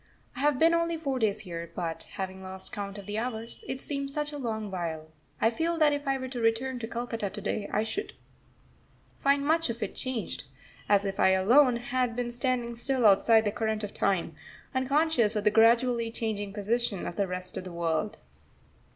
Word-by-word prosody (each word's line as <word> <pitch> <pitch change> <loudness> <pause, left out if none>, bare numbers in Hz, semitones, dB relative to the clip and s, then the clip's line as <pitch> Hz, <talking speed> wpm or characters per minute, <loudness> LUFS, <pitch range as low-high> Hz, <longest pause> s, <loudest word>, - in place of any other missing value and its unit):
I - - -7
have 290 -1 +3
been 330 +4 +5
only 335 0 +1
four 275 -5 -2
days 215 -3 +1
here, 170 -2 -6
but, 165 -2 -3
having 190 -1 -5
lost 190 0 -8
count 200 0 -5
of 200 - -9
the 210 +2 -2
hours, 230 -1 -4
it 260 0 -3
seems 280 -1 -2
such 295 +1 -2
a 290 - -6
long 220 -5 -3
while, 160 -4 -4 0.3
I 225 - +3
feel 330 +7 -1
that 305 -2 +4
if 285 -1 -3
I 270 0 +2
were 260 -1 -5
to 250 -1 -4
return 235 +3 +1
to 225 - -4
Calcutta 230 -3 -3
to 210 - -7
day 205 0 -2
I 215 - +1
should 365 - -3 1.1
find 280 0 +3
much 325 -1 +2
of 235 -1 -3
it 200 - -4
changed 240 - -3 0.4
as 205 -1 +4
if 195 -1 -3
I 190 - +5
alone 245 +7 +5
had 245 0 -1
been 245 -1 -2
standing 240 -1 0
still 250 +1 0
outside 220 +2 +6
the 205 - +1
current 220 0 -1
of 205 - -5
time, 185 -4 0 0.4
unconscious 260 -4 +2
of 210 - 0
the 210 - +4
gradually 230 +1 +4
changing 215 -3 -3
position 210 0 -1
of 175 - -4
the 200 -2 0
rest 180 0 -5
of - - -4
the 185 - -8
world. 170 +3 -1
225 Hz, 205 wpm, -29 LUFS, 200-260 Hz, 1.1 s, outside